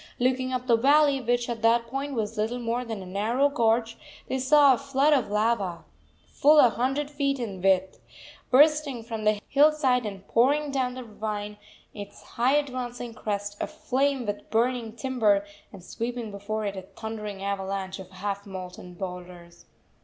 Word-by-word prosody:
Looking 255 +1 0
up 255 -1 -2
the 235 -2 +4
valley, 280 +2 +4
which 245 0 0
at 235 -2 -4
that 230 +1 +3
point 270 +3 -4
was 220 -1 -2
little 220 +3 -1
more 240 +1 -2
than 225 -5 -6
a - - -10
narrow 220 +9 +1
gorge, 230 -3 +1 0.3
they 265 - -2
saw 280 +1 +6
a - - 0
flood 275 +2 +2
of 265 -7 +1
lava, 210 -4 0 0.4
full 300 - +4
a 255 -5 +7
hundred 270 +5 -1
feet 280 -1 0
in 205 -7 -5
width, 190 0 +2 0.5
bursting 290 -2 +4
from 225 -2 -5
the 210 -1 +3
hillside 280 -5 +3
and 195 -1 -9
pouring 285 +5 +2
down 255 -2 -1
the 255 - -6
ravine, 210 -2 -5 0.4
its 205 -1 -10
high 250 +4 +1
advancing 250 -4 -3
crest 205 -3 -4
aflame 270 -1 -1
with 205 -1 -5
burning 235 0 0
timber, 225 -6 +1 0.3
and 195 -4 -12
sweeping 235 +2 -5
before 210 +2 -4
it 200 -1 -3
a 190 - -5
thundering 210 0 -7
avalanche 195 -1 -3
of 185 -1 -10
half 200 +2 -5
molten 180 -1 -8
boulders. 180 -2 -9
230 Hz, 165 wpm, -26 LUFS, 205-260 Hz, 0.5 s, a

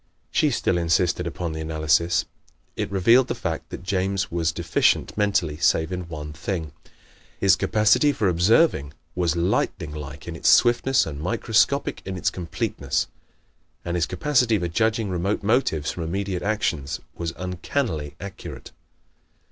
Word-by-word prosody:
She - - +3
still 85 - 0
insisted 85 +1 +1
upon 85 0 -4
the 80 0 -5
analysis. 80 +2 +1 0.5
It - - -2
revealed 115 +7 +4
the - - -2
fact - - -4
that - - -8
James 95 0 -1
was 85 -1 0
deficient - - +1
mentally, 100 -7 +1
save 80 +1 +2
in 90 -1 -4
one 75 -2 -7
thing. 80 +2 -4 0.7
His 95 -2 +5
capacity 110 +9 +3
for 110 -7 0
observing 90 - +3 0.2
was 85 -2 0
lightning 85 -2 0
like 75 0 -8
in 85 - -5
its - - +2
swiftness 120 +2 +4
and 75 -2 -6
microscopic 115 - +1
in 95 -1 -5
its - - 0
completeness. 85 -2 -2 0.8
And 85 - -2
his 85 - +1
capacity 120 +2 +2
for 90 -3 -2
judging 110 +3 0
remote 95 +4 -1
motives 100 - +1
from 90 - -6
immediate 95 +2 -2
actions 85 -9 -1
was 85 -1 -4
uncannily 90 - -3
accurate. 100 -1 -9
90 Hz, 145 wpm, -24 LUFS, 80-105 Hz, 0.8 s, His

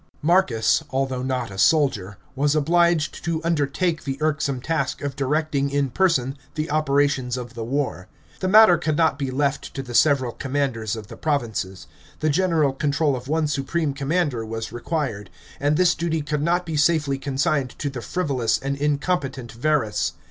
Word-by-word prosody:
§ - - -33 0.2
12. - - -34
Marcus, 160 -6 +3
although 130 -1 -1
not 130 -3 -2
a 95 - -7
soldier, 105 - +2 0.2
was 145 +2 +1
obliged 170 0 +2
to 165 -1 -1
undertake 165 +1 0
the 135 -1 -3
irksome 150 -3 0
task 145 -1 -2
of 140 -2 -3
directing 140 0 0
in 140 -2 0
person 135 -7 +1 0.2
the 155 -1 -3
operations 140 -4 +1
of 125 -1 -7
the 115 -2 -5
war. 125 -7 -2 0.3
The 185 - -1
matter 210 -2 +7
could 155 -2 -1
not 160 -4 +2
be 135 -2 -2
left 140 +1 -1
to 135 - -3
the 125 -2 -8
several 130 -2 +3
commanders 130 -5 -2
of 110 -2 -7
the - - -11
provinces; 115 - -2 0.3
the 155 0 +1
general 160 -4 +2
control 145 +1 +1
of 125 0 -7
one 155 +2 +1
supreme 145 +2 -1
commander 140 -3 -1
was 115 0 -5
required; 120 - -3 0.3
and 145 +2 +1
this 180 -1 +4
duty 160 -2 -2
could 145 0 -2
not 175 +3 +1
be 160 -2 -3
safely 145 -2 +2
consigned 135 -1 -1
to 145 - -3
the 125 -3 -6
frivolous 135 -8 0
and 140 +1 -3
incompetent 140 -3 -1
Verus. 115 -5 0
140 Hz, 175 wpm, -23 LUFS, 130-155 Hz, 0.3 s, matter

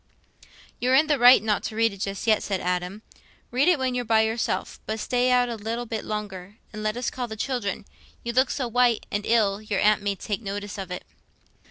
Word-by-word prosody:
"You're 255 +2 +3
in 300 +4 +5
the 295 -3 +1
right 245 -1 +8
not 215 -2 +1
to 215 - -4
read 225 -1 +2
it 200 - -12
just 195 -1 -3
yet," 220 -2 +3
said 195 -2 -2
Adam. 180 +4 -3 0.5
"Read 260 +6 +2
it 360 -3 +5
when 260 -2 -1
you're 245 0 -1
by 220 -1 +3
yourself. 220 +1 -2
But 220 +1 -2
stay 250 +3 +1
out 250 -1 +4
a 240 - -3
little 225 +3 -4
bit 220 -1 -4
longer, 205 -2 -6 0.2
and 215 - -6
let 215 +2 -1
us 245 - -2
call 250 -1 -4
the 220 - -6
children: 220 -5 -3 0.4
you 235 - -3
look 260 +2 +3
so 260 -3 -2
white 240 -1 +2
and 205 0 -2
ill, 215 -3 +2
your 210 -2 -2
aunt 210 0 +3
may 200 0 -1
take 205 +3 -4
notice 205 0 -5
of 190 -2 -6
it." 180 0 -6
220 Hz, 225 wpm, -25 LUFS, 205-245 Hz, 0.5 s, right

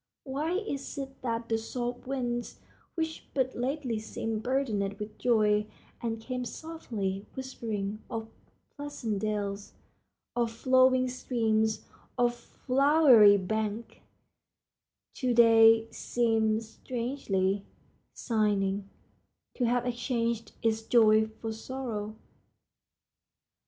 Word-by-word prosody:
Why 290 +5 -2
is 365 -11 -3
it 270 -1 -6
that 230 -2 -2
the 225 -1 0
soft 245 +2 -4
winds, 245 -3 -3 0.4
which 320 -1 -3
but 260 -1 +1
lately 255 -2 -2
seemed 220 0 -4
burdened 220 -6 -1
with 210 0 -8
joy, 210 -3 +3 0.3
and 225 -1 -2
came 250 +2 -4
softly 225 -10 -5
whispering 220 -6 -4
of 225 -1 -4 0.5
pleasant 265 -8 -4
dells, 205 -1 -3 0.6
of 235 -2 +1
flowing 255 +2 +4
streams, 220 -3 0 0.3
of 240 -1 +3
flowery 255 -5 +5
banks, 215 +3 -3 1.2
to 250 -2 0
day 225 -1 +7
seem 225 -2 +1
strangely 220 -4 -2 0.5
sighing, 205 -3 0 0.6
to 250 - 0
have 245 +1 +1
exchanged 235 -2 -2
its 225 -1 +1
joy 220 -1 +5
for 220 0 -6
sorrow? 220 -3 -5
230 Hz, 100 wpm, -29 LUFS, 215-255 Hz, 1.2 s, day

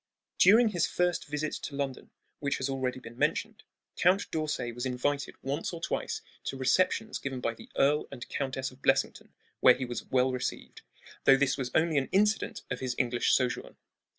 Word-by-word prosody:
During 220 +5 +7
his 175 -5 +1
firsts 180 -1 0
visit 150 +1 -3
to 140 - -6
London, 140 -2 -4 0.3
which 140 -1 -1
has 130 +1 -2
already 130 -1 -2
been 120 -1 -12
mentioned, - - 0 0.3
Count 190 +3 +2
d'Orsay 150 -6 -2
was 120 +1 -6
invited 135 +2 -1
once 140 +6 -2
or 170 - -5
twice - - -3 0.2
to 135 - -3
receptions 185 - +1
given 135 -2 -4
by 115 -2 -1
the - - -14
Earl 145 +2 +3
and 125 -3 -8
Countess 130 -1 -3
of 130 +1 -18
Blessington, - - +1 0.3
where 125 - +7
he 130 - -3
was 120 -1 -5
well 130 0 +2
received, 125 -1 -4 0.4
though 135 - +7
this 135 -1 +2
was 130 -2 -3
only 160 -2 +3
an 135 - -4
incident 210 +2 +1
of - - -2
his 125 -1 -2
English 120 -1 +1
sojourn. 125 -2 -1
135 Hz, 180 wpm, -29 LUFS, 130-155 Hz, 0.4 s, During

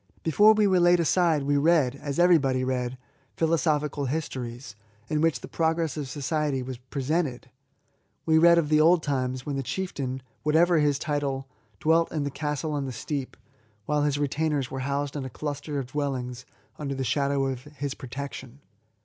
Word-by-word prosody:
Before 205 +7 +6
we 215 -1 +3
were 190 -2 +4
laid 175 0 +5
aside, 165 -3 +2
we 145 +1 +1
read, 150 -4 +3
as 140 0 -5
everybody 150 -8 +4
read, 130 -1 -2 0.4
philosophical 150 -3 +1
histories, 125 -5 -4 0.3
in 155 -1 0
which 160 -6 +1
the - - -8
progress 160 -2 0
of 145 -4 -4
society 145 -1 -1
was 125 -1 -6
presented; 135 0 -2 0.7
we 160 -1 +4
read 170 +1 +7
of 160 -3 +1
the 155 0 +4
old 165 +1 +5
times. 130 -3 -1
LIFE - - -20
TO - - -25
THE 150 - -3
INVALID. 135 - -5
69 180 -8 -3
wben 130 - -3
the - - -11
chieftain^ - - -33 0.2
whatever 165 +2 +4
his 145 -2 +2
title^ 140 -2 -2 0.3
dwelt 165 +1 +3
in 155 -3 -1
the 140 - -3
castle 150 +1 -3
on 145 -2 -2
the - - -4
steep, 135 +3 -5 0.5
while 150 0 +1
his 145 -1 +1
retainers 145 -1 -1
were 135 - -4
housed 140 +1 -2
in 145 - -3
a 130 - -5
cluster 145 +2 -4
of 135 - -2
dwellings 130 -3 -3 0.3
under 140 -2 -3
the 135 - -2
shadow 140 +1 +1
of 130 -1 -4
his 145 -2 -5
protection. 135 0 -8
145 Hz, 190 wpm, -26 LUFS, 135-160 Hz, 0.7 s, read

